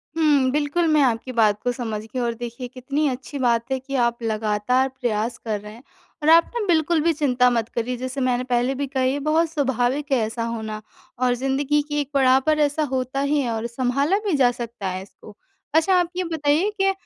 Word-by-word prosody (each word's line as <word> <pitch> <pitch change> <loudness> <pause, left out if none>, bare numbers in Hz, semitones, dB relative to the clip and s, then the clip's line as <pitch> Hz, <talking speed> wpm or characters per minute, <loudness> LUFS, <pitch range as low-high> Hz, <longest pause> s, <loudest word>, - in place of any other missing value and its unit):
हुँ, 295 -5 +3
बिल्कुल, 300 +4 0
मैं 305 -1 +4
आपकी 245 +1 0
बात 215 -3 +2
को 245 - +1
समझ 225 -4 -4
गई 240 +3 -6
और 235 -1 0
देखिए, 240 +2 -6
कितनी 275 +4 -2
अच्छी 265 +2 -6
बात 235 0 +1
है 265 - 0
कि 275 +2 -6
आप 235 0 -2
लगातार 220 +4 +1
प्रयास 240 -3 -2
कर 215 -2 -3
रहे 210 0 -10
हैं 235 - -15 0.4
और 310 - +3
आप 335 +1 +6
ना 460 - -1
बिल्कुल 325 -1 +2
भी 335 - +3
चिंता 250 -4 +2
मत 230 -2 0
करिए। 245 +1 -3
जैसे 255 +2 -4
मैंने 250 -1 +1
पहले 250 +1 0
भी 280 +1 -3
कहा, 260 -1 -1
ये 265 +3 +1
बहुत 315 +3 +1
स्वाभाविक 275 -1 -1
है 265 - +4
ऐसा 230 +1 -4
होना 220 -2 -4 0.4
और 250 -1 +2
ज़िंदगी 270 +3 0
की 295 0 -1
एक 280 - -6
पड़ाव 265 -1 +4
पर 310 -1 +2
ऐसा 295 +1 +1
होता 260 +1 -2
ही 285 +1 +1
है 240 - -2
और 225 +1 -2
सँभाला 265 - 0
भी 400 - 0
जा 250 -2 +4
सकता 235 -5 -6
है 185 0 -4
इसको। 205 +2 -16 0.4
अच्छा, 325 +4 +3
आप 355 -2 +2
ये 370 - 0
बताइए 320 +2 +1
कि 390 0 +4
255 Hz, 220 wpm, -23 LUFS, 235-290 Hz, 0.4 s, आप